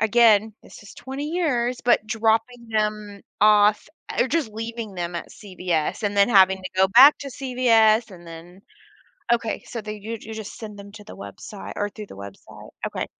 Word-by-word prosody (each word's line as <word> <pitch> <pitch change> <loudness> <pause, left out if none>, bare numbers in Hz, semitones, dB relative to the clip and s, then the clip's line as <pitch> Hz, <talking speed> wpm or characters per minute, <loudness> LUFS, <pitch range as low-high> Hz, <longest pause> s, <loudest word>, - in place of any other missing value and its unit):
again, 220 -1 +4
this - - -15
is 205 - -13
20 270 +2 -7
years, 255 -8 -1
but 240 -3 +3
dropping 225 +2 -1
them 210 -2 -2 0.2
off 210 0 +4 0.3
or 255 - +2
just 315 -7 -1
leaving 225 -1 -6
them 175 -1 -4
at 170 - -6
CVS 180 -4 -3
and 205 -1 -2
then 200 +2 +5
having 190 -4 +5
to 185 0 -8
go 190 0 +4
back 260 +9 +7
to 280 - -7
CVS 235 -4 +2
and 175 -2 -14
then 170 +3 -12 0.7
okay. 230 -2 -2
So 235 - -6
they 215 0 -6
you 220 - -7
you 220 - -9
just 220 -2 -8
send 210 -2 -9
them 200 0 -11
to 210 0 -12
the 215 - -12
website 100 - -9
or 205 0 -2
through 210 +1 -10
the - - -12
website. 100 0 -12 0.2
Okay. - - -4
215 Hz, 185 wpm, -23 LUFS, 200-235 Hz, 0.7 s, back